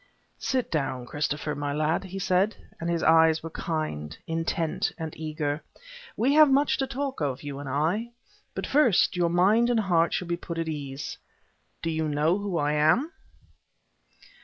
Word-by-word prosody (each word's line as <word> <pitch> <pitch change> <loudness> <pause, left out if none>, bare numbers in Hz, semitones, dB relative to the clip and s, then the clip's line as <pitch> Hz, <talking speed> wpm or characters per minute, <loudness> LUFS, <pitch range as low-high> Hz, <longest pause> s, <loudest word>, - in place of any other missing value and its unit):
"Sit 255 -2 -1
down, 130 -5 -1
Christopher 145 +3 -2
my 145 0 -3
lad," 155 +5 0
he 190 +1 -7
said, 190 +3 +1 0.2
and 170 - -3
his 170 -1 0
eyes 160 0 +5
were 165 - -6
kind, 80 - -3
intent 165 0 -1
and 160 -2 -5
eager. 155 -1 -3 0.6
"We 260 +5 +3
have 305 -1 +7
much 280 +2 +3
to 270 - 0
talk 270 - -4
of, 140 -2 -2
you 140 -1 -5
and 140 -1 -6
I. 165 - 0 0.5
But - - -3
first, 265 -11 +3
your 175 -1 +2
mind 205 +7 +4
and 240 -2 +3
heart 170 -4 +2
shall 180 - -2
be 170 0 -1
put 170 -1 -6
at 165 -1 -2
ease. 140 -3 -5 0.6
Do 165 - 0
you 160 0 -1
know 155 +5 +1
who 200 -4 -2
I 145 -1 +1
am?" 155 - +3
165 Hz, 170 wpm, -27 LUFS, 150-195 Hz, 0.6 s, have